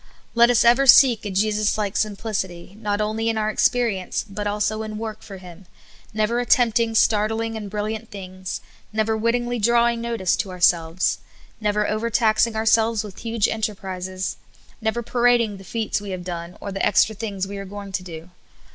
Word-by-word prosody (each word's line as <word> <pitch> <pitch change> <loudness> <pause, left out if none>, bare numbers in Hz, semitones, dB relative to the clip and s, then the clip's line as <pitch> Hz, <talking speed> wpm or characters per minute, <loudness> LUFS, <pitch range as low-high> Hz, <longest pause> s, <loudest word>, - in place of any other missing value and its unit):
Let 235 0 +5
us 240 -1 +4
ever 245 +4 +5
seek 245 -3 +7
a - - -3
Jesus 210 +2 +1
like 205 -1 -2
simplicity, 195 -4 -3
not 205 -1 -1
only 220 +2 -1
in 225 - -1
our 215 0 0
experience, 220 -5 0
but 205 +1 -4
also 210 +1 -1
in 215 -1 -5
work 220 -1 -6
for 195 - -10
Him; 180 0 -13 0.4
never 215 +2 0
attempting 230 -2 +2
startling 220 +1 +2
and 210 -2 -6
brilliant 215 +2 -4
things; 185 -2 -7 0.3
never 220 +1 0
wittingly 240 +2 0
drawing 235 +1 +3
notice 230 -6 0
to 225 -4 -2
ourselves; 175 -1 +1 0.4
never 210 -1 0
overtaxing 220 0 +1
ourselves 220 0 +2
with 205 -3 -10
huge 230 -2 0
enterprises; 190 -3 -4 0.4
never 225 +2 -1
parading 240 -3 +2
the 190 - -12
feats 220 0 -2
we 205 - -7
have 185 -2 -5
done, 170 -1 -6
or 200 - -6
the 195 - -3
extra 210 +2 +3
things 200 -3 -4
we 200 +1 -7
are 195 - -6
going 200 0 -8
to 190 - -2
dt>. 165 -1 -9
215 Hz, 170 wpm, -22 LUFS, 195-225 Hz, 0.4 s, seek